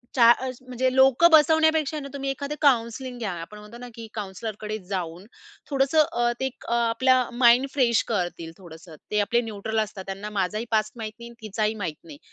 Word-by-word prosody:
च्या 235 -3 +7
अ, 260 +2 0 0.2
म्हणजे 255 +1 -1
लोकं 270 +5 +6
बसवण्यापेक्षा 315 -1 +4
ना, 275 - -7
तुम्ही 275 -1 -3
एखादं 280 +2 -5
काउंसलिंग 245 -1 +1
घ्या. 210 -5 -3
आपण 210 +5 -10
म्हणतो 210 +3 -12
ना, 245 0 -9
की 225 -1 -9
काउंसलरकडे 215 +1 -5
जाऊन 180 -1 -4 0.4
थोडंसं 275 +2 +2
अ, 240 0 +1
ते 265 - -1
एक 265 - -7
आपल्या 235 +2 +3
माइंड 245 +2 +5
फ्रेश 240 -5 +2
करतील, 175 -5 -3
थोडंसं. 165 -2 -13 0.2
ते 210 - +1
आपले 235 +4 +1
न्यूट्रल 220 -1 -3
असतात. 205 -3 -4
त्यांना 195 +2 -6
माझाही 210 +5 -1
पास्ट 215 +4 +1
माहीत 215 -1 -6
नाही 235 - -9
आणि 230 -2 -14
तिचाही 215 +1 -1
माहीत 155 -3 -3
नाही. 155 -4 -12
230 Hz, 185 wpm, -25 LUFS, 210-260 Hz, 0.4 s, च्या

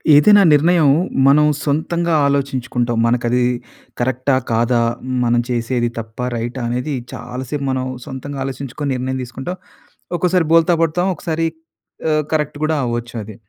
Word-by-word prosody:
ఏదైనా 205 +8 +7
నిర్ణయం 160 0 +4 0.4
మనం 150 +2 +6 0.2
సొంతంగా 170 +3 0
ఆలోచించుకుంటాం. 130 -4 -1
మనకి 120 +1 +1
అది 125 +1 +2 0.6
కరెక్టా? 130 +2 +1 0.2
కాదా? 115 +1 +2 0.2
హ్మ్. 130 0 -3
మనం 120 0 +2
చేసేది 120 0 0
తప్పా? 115 +2 -5
రైటా? 120 +3 -4
అనేది 125 +5 -2 0.2
చాలాసేపు 130 +3 -5
మనం 130 -1 -1 0.2
సొంతంగా 140 0 -6
ఆలోచించుకొని 135 +2 -4
నిర్ణయం 130 +1 -2
తీసుకుంటాం. 135 +9 -6 0.6
ఒక్కోసారి 180 -1 +2
బోల్తా 165 +1 +5
పడతాం. 175 +3 0
ఒకసారి 165 0 -1 0.6
ఆహ్, 155 0 +2
కరెక్ట్ 150 -2 -1
కూడా 155 +1 +1
అవ్వచ్చు 120 0 -3
అది. 105 0 -10
130 Hz, 135 wpm, -18 LUFS, 120-155 Hz, 0.6 s, ఏదైనా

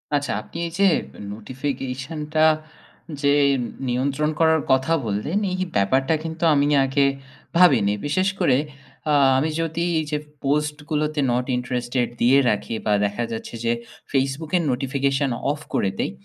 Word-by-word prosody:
আচ্ছা, 145 0 -1
আপনি 165 - -11
এই - - -8
যে 200 - +5 0.5
নোটিফিকেশনটা 135 +6 -3 0.8
যে 140 -1 +4 0.5
নিয়ন্ত্রণ 140 +4 0
করার 160 -1 +4
কথা 130 +5 +3
বললেন, 110 - -1
এই 185 - -2 0.2
ব্যাপারটা 130 +9 +2
কিন্তু 160 +1 -5
আমি 140 -1 +3 0.2
আগে 135 +1 +2 0.5
ভাবিনি। 125 - +5
বিশেষ 185 +6 +1
করে 130 - +3 0.5
আ - - +3 0.2
আমি 150 +4 +1
যদি 165 +1 -2 0.2
এই 155 - -2
যে, 150 - +1 0.3
পোস্টগুলোতে 150 +1 -1
নট 125 +1 0
ইন্টারেস্টেড 125 0 -1
দিয়ে 130 +3 +5
রাখি 105 +2 -2
বা 105 - +2
দেখা 105 +4 -2
যাচ্ছে 115 +1 -6
যে, 115 - +3 0.4
Facebook 135 +3 -1
এর 175 - 0
নোটিফিকেশন 135 +1 0 0.2
অফ 145 - -4
করে 100 - +1
দেই। - - 0
140 Hz, 140 wpm, -23 LUFS, 125-150 Hz, 0.8 s, যে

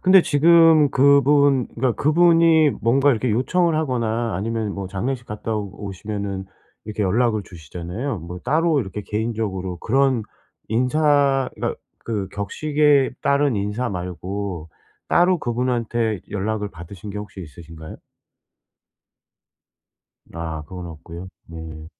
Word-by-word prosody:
근데 185 -1 +6
지금 160 -1 +5
그분 140 -1 +4
그니까 125 0 +1
그분이 165 +2 +4
뭔가 135 +5 +3
이렇게 120 -1 0
요청을 165 +9 +1
하거나 120 - -1
아니면 110 +1 -2
뭐 95 -1 -5
장례식 120 +6 -3
갔다 105 +1 -4
오시면은 100 -1 -5 0.4
이렇게 105 0 -3
연락을 110 +2 +1
주시잖아요. 90 - -6
뭐 85 +2 -8
따로 155 +1 +2
이렇게 100 -1 -6
개인적으로 105 -5 -3
그런 130 +1 +1 0.5
인사 135 +2 +2
그니까 - - -3 0.3
그 105 -4 -3
격식에 145 +6 +1
따른 140 -2 +2
인사 105 +5 -2
말고 90 -1 -5 0.4
따로 180 +1 +3
그분한테 120 - -1
연락을 105 +1 -2
받으신 85 +4 -10
게 105 - -5
혹시 105 -2 -8
있으신가요? 80 0 -11 2.4
아 80 -2 -5
그건 90 +3 -8
없고요. 85 +3 -9 0.2
네. 80 -1 -9
110 Hz, 280 characters per minute, -22 LUFS, 95-140 Hz, 2.4 s, 근데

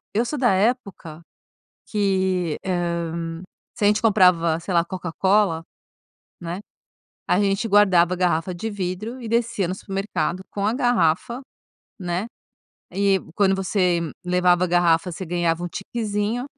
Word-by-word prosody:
eu 235 +3 +2
sou 295 - -3
da 245 - +3
época 195 -6 -1 0.7
que, 190 -5 0
hã, 170 -2 -2 0.3
se 205 - -1
a - - +6
gente 210 +1 +2
comprava, 180 -7 +4
sei 180 +3 -5
lá, 170 0 +2
Coca-Cola 185 -1 0 0.8
né, 175 +3 -5 0.7
a 180 - +2
gente 200 +3 +1
guardava 185 -4 +5
a - - -4
garrafa 180 0 0
de 220 +6 -4
vidro 205 +5 -4
e 230 - -6
descia 230 -4 0
no 180 - -2
supermercado 190 -2 -3
com 200 0 -1
a 220 - +1
garrafa 240 -2 +1 0.6
né, 180 +2 -2 0.7
e 195 0 +2 0.2
quando 195 -1 +3
você 185 -2 +1 0.2
levava 180 0 +3
a - - +1
garrafa 175 0 +2
você 185 +3 -6
ganhava 170 0 -1
um - - -3
tiquezinho 210 +4 -3
185 Hz, 140 wpm, -23 LUFS, 175-205 Hz, 0.8 s, a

